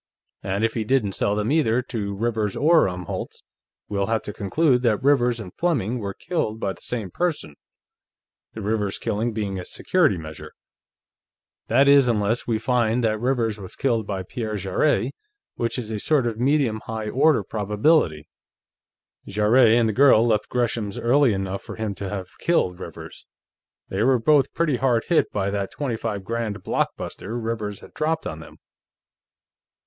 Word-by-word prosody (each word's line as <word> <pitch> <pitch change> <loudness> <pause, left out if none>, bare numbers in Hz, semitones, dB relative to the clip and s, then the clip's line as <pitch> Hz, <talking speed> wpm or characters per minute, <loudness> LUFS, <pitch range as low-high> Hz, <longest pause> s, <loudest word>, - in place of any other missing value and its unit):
"And 100 +3 -1
if 115 - -1
he 115 - -1
didn't 110 -3 +1
sell 100 +1 0
them 105 +4 -1
either 125 -6 +2
to 100 -5 -4
Rivers 110 -1 -1
or 160 -2 +4
Umholtz, 90 -1 -6 0.4
we'll 100 -1 -1
have 115 -1 0
to 105 - -6
conclude 125 +6 +1
that 115 -3 +1
Rivers 125 -4 +3
and 95 -5 -8
Fleming 125 - 0
were 100 -3 -5
killed 135 -11 -2
by 95 - -1
the - - -18
same 110 -7 -4
person, 170 - -2 1.0
the 110 - -7
Rivers 105 -1 -1
killing 115 +1 -1
being 100 -3 -3
a - - -5
security 155 - +1
measure. 80 -1 -9 1.1
That 140 +1 +4
is, 140 -2 +6
unless 110 0 0
we 115 -2 +1
find 120 0 +1
that 110 -1 +1
Rivers 115 -3 0
was 95 -2 -9
killed 115 -5 0
by 95 -2 -3
Pierre 110 +3 -4
Jarrett, 115 +7 0 0.4
which 115 +2 -2
is 115 -3 -5
a 110 - -3
sort 145 +2 +2
of 115 -2 -2
medium 130 -4 +1
high 110 -1 -4
order 140 -1 +3
probability. 105 - +1 1.0
Jarrett 110 +4 +4
and 115 0 +4
the 110 - 0
girl 125 -2 +6
left 110 -3 +1
Gresham's 115 -4 -1
early 130 +2 +3
enough 95 -1 -3
for - - -9
him 110 -2 -3
to 95 0 -6
have 95 -2 -7
killed 95 - +1
Rivers; - - -10 0.6
they 95 - -2
were 130 +3 +4
both 140 +4 +3
pretty 155 -6 +1
hard 120 -2 +2
hit 170 - +3
by 100 -1 -1
that 100 -1 -2
twenty 135 -6 -3
five 105 -3 -4
grand 110 -2 -3
blockbuster 115 - -3
Rivers 110 -3 -4
had - - -14
dropped 160 +1 -1
on 80 - -5
them.... 80 - -13
110 Hz, 170 wpm, -23 LUFS, 100-125 Hz, 1.1 s, is